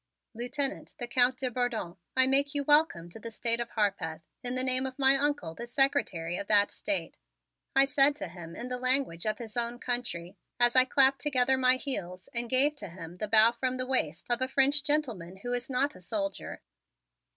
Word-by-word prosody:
"Lieutenant, 265 +4 -3
the 240 - -4
Count 250 +1 +2
de 255 -1 -2
Bourdon, 235 -8 -3 0.2
I 260 - +6
make 280 +2 +2
you 285 - +1
welcome 295 - +2
to 225 - -11
the 230 - -8
State 230 +1 -1
of 235 0 -4
Harpeth, 195 -8 -2 0.2
in 245 0 -3
the 255 - +1
name 260 0 +3
of 260 - -9
my 270 -1 +5
Uncle, 280 - -1
the 235 +7 -9
Secretary 240 - 0
of 200 - -6
that 205 -1 +4
State," 300 -2 -3 0.6
I 270 0 +6
said 275 +1 +3
to 195 - -6
him 170 -1 -11
in 240 - -6
the 250 0 -2
language 255 -8 +1
of 215 - -1
his 225 -3 -10
own 240 0 0
country 240 -9 -4 0.2
as 240 0 +3
I 255 0 +8
clapped 270 +1 +3
together 265 -3 +2
my 255 0 +3
heels 185 -10 -5
and 235 -1 -2
gave 275 +4 +3
to 200 - -8
him 170 0 -11
the 215 - -4
bow 220 +2 +6
from 255 +1 -3
the 255 - -3
waist 240 - -1
of 240 +1 +1
a 260 - 0
French 275 +2 +3
gentleman 240 - -2
who 245 0 -3
is 245 +1 -4
not 275 +3 0
a - - -14
soldier. 195 +1 -5
245 Hz, 205 wpm, -28 LUFS, 210-270 Hz, 0.6 s, I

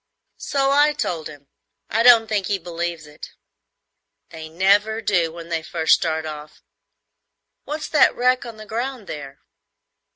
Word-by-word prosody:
"So 275 -1 0
I 295 +2 +4
told 165 - -3
him. 145 -2 -14 0.4
I 225 - 0
don't 235 -2 +7
think 210 -3 -2
he 200 - 0
believes 170 -2 -5
it." 150 0 -12 1.0
"They 160 -1 -9
never 200 +6 +2
do 180 -7 0
when 170 0 -10
they 165 -1 -1
first 160 0 +1
start 160 -1 0
off. 150 -1 -9 1.0
What's 300 +1 -5
that 305 - +4
wreck 255 +1 +2
on 230 -2 -9
the 215 - -10
ground 240 +1 -4
there?" 140 -5 -9
185 Hz, 150 wpm, -21 LUFS, 160-230 Hz, 1.0 s, don't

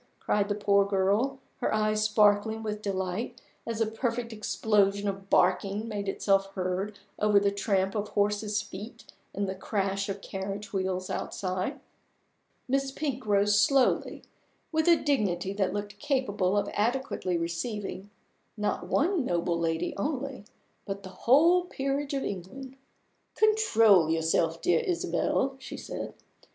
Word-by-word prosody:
cried 205 0 0
the 205 - 0
poor 200 -1 +3
girl, 200 +7 +1 0.2
her - - -1
eyes 215 0 +1
sparkling 215 +1 +3
with 210 -1 -3
delight 195 +5 -3 0.3
as 230 -1 -3
a 225 - +3
perfect 230 +1 -2
explosion 205 -2 +1
of 195 0 -4
barking 195 +4 +2
made 205 -3 -3
itself 195 0 +2
heard 190 +2 -2 0.2
over 210 -1 +5
the 200 0 +2
tramp 195 -1 0
of 210 -1 -2
horses' 210 +1 0
feet 210 +7 -9 0.3
and 200 0 -2
the 190 - -2
crash 195 0 -2
of 195 0 -3
carriage 195 +2 -6
wheels 185 -1 -2
outside. 185 +9 -3 0.9
Miss 270 +1 +1
Pink 265 -5 -4
rose 205 0 +4
slowly, 265 +4 +2 0.5
with 315 0 +1
a 340 - +8
dignity 200 - 0
that 195 -2 0
looked 205 0 -5
capable 210 -10 0
of 205 0 +1
adequately 215 -5 0
receiving 195 +4 -4 0.5
not 210 0 -2
one 340 +1 +2
noble 170 -5 0
lady 165 -1 -1
only, 270 0 -3 0.4
but 200 0 -5
the 190 - -8
whole 315 - +4
peerage 275 -2 -2
of 270 - -1
England. 255 +8 -6 0.6
"Control 225 - +5
yourself, 160 0 +1
dear - - +4
Isabel," 340 - 0
she 260 - -8
said. - - -6
205 Hz, 140 wpm, -28 LUFS, 195-245 Hz, 0.9 s, a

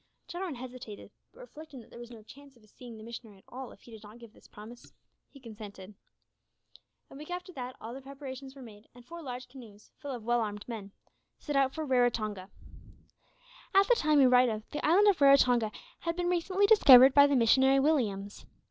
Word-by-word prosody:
Jarwin 350 -3 -6
hesitated, 245 -4 -10 0.2
but - - -17
reflecting 310 - -12
that 230 - -17
there - - -12
was 240 0 -10
no 230 -3 -13
chance 280 +4 -16
of 235 - -24
his 215 - -24
seeing 240 -3 -12
the 215 - -12
missionary 225 -2 -11
at 190 - -23
all 260 0 -9
if - - -18
he 240 - -17
did 220 -2 -12
not 215 +1 -14
give 235 -2 -15
this - - -21
promise, 225 +4 -14 0.4
he 280 - -17
consented. 210 -4 -12 1.2
A - - -12
week 300 +3 -11
after 360 +1 -7
that 255 -2 -7
all 225 +2 -9
the 270 - -9
preparations 270 0 -10
were 270 - -12
made, 215 -2 -15
and 245 -1 -16
four 340 +5 -10
large 250 -3 -8
canoes, 230 -6 -16
full 285 - -9
of 245 -4 -6
well 240 0 +1
armed 210 -1 -6
men, 215 -4 -8 0.5
set 295 - -6
out 270 -1 +1
for 315 -1 -4
Raratonga. 225 -7 -1 1.3
At 390 0 +5
the - - +5
time 305 -7 +1
we 275 - +6
write 250 0 +4
of, 215 -1 -6
the 295 - -5
island 380 +7 +4
of 390 -7 +2
Raratonga 250 -5 +4 0.3
had 335 0 -4
been 350 0 -2
recently 370 +3 0
discovered 270 - +7
by 285 0 +6
the 285 - 0
missionary 265 +3 +3
Williams. 215 -9 -2
255 Hz, 210 wpm, -29 LUFS, 225-285 Hz, 1.3 s, discovered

